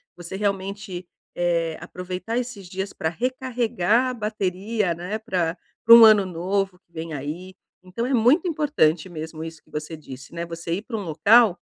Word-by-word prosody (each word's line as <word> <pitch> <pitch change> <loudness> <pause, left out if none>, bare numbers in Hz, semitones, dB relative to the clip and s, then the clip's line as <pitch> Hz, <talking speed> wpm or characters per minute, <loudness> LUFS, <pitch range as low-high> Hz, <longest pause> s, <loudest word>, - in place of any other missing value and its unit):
você 175 +1 -8
realmente, 195 -2 -3 0.3
eh, 170 -2 0
aproveitar 180 +6 -5
esses 235 -6 -4
dias 190 +2 -4
para 160 - -2
recarregar 245 0 0
a - - -3
bateria, 210 -2 -1
né. 180 +6 -4
Pra 180 -5 -1 0.3
para 230 - +10
um 235 - +10
ano 215 -3 +7
novo 185 +2 -2
que 170 - -46
vem 165 -1 -6
aí. 155 +7 -6 0.3
Então 185 +6 -4
é 270 - -1
muito 255 +9 +4
importante 285 - +1
mesmo 160 -2 -7
isso 165 -1 -8
que - - -28
você 150 +2 -5
disse, 135 -3 -11
né. 170 0 -4
Você 170 0 -5
ir 190 - -2
para 225 +1 -5
um - - -3
local 195 +5 +5
185 Hz, 175 wpm, -24 LUFS, 170-220 Hz, 0.3 s, para